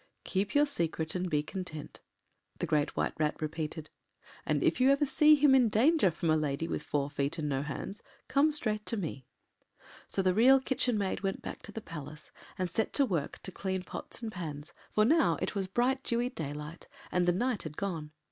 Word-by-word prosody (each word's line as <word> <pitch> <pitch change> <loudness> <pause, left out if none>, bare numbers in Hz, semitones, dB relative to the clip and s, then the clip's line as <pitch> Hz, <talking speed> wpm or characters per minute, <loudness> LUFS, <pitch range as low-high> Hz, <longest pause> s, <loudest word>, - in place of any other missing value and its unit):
” - - -48
“Keep 200 +4 -1
your 290 +1 +6
secret 165 - -2
and 185 0 -2
be 150 -2 +1
content,” 160 -3 -7 0.6
the - - -2
Great 150 -1 0
White - - 0
Rat 150 -1 0
repeated, 155 0 -4 0.6
“and - - +1
if - - +2
ever 275 +3 +5
you - - +4
see 300 +2 +6
him 290 -2 +5
in 250 -4 +5
danger 255 - +4
from 165 0 -1
a - - +4
lady 150 +1 -1
with - - -2
four 145 -2 -1
feet 140 +2 -2
and 155 -2 -2
no 135 -2 0
hands, 150 +8 -5 0.3
come 285 +3 +3
straight 215 -8 +1
to 230 - 0
me.” 150 -9 -5 0.8
So 195 - 0
the 185 -1 +3
Real 255 +6 +6
Kitchen 255 -3 0
Maid 195 -2 -1
went 195 -1 -2
back - - -6
to - - -10
the 225 - -6
Palace, 150 -4 -9 0.3
and 185 - 0
set 205 +6 -1
to 280 - +4
work 170 - -3
to 190 - -5
clean 190 0 -3
pots 230 - -8
and 220 - -3
pans, 155 -6 -6 0.2
for 215 - +3
now 320 +7 +4
it - - -2
was 195 -2 -2
bright 250 +7 +1
dewy 240 0 0
daylight, 150 - -6 0.2
and 180 -1 +1
the - - +6
night 235 +4 0
had 155 -1 -7
gone. 170 -7 -3
185 Hz, 210 wpm, -31 LUFS, 155-240 Hz, 0.8 s, your